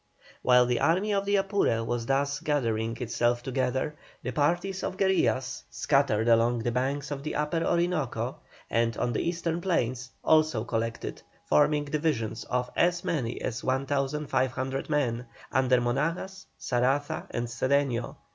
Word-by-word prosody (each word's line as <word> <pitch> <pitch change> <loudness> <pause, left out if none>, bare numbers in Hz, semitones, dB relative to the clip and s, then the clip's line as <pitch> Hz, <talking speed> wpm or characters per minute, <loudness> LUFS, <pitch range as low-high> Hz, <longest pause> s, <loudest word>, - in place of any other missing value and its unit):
While 125 0 +5
the 120 -1 +1
Army 180 +9 +2
of 200 0 +1
the 200 0 +2
Apure 195 - +1
was 115 0 -2
thus 140 +1 +1
gathering 115 -8 -1
itself 120 0 0
together, 130 +3 -1 0.3
the - - -2
parties 175 +6 0
of 185 - -3
guerillas, 155 -10 +1
scattered 135 -6 +1
along 115 0 +3
the 120 - 0
banks 135 +4 -1
of 140 -1 -3
the 155 +2 -4
Upper 150 +3 0
Orinoco, 170 -6 0 0.3
and 115 0 +1
on 120 - 0
the - - 0
eastern 170 0 -1
plains, 130 -8 -1
also 155 -8 +3
collected, 115 -1 -3 0.2
forming 145 - +3
divisions 140 -7 -1
of 125 0 -1
as 175 0 +2
many 125 -7 -2
as 115 0 -3
1,500 135 -1 -1
men, 125 -5 0 0.2
under 130 -1 +3
Monagas, 165 +10 -2
Saraza 130 +4 0
and 120 - -2
Cedeño. 125 +1 0
135 Hz, 140 wpm, -28 LUFS, 120-155 Hz, 0.3 s, While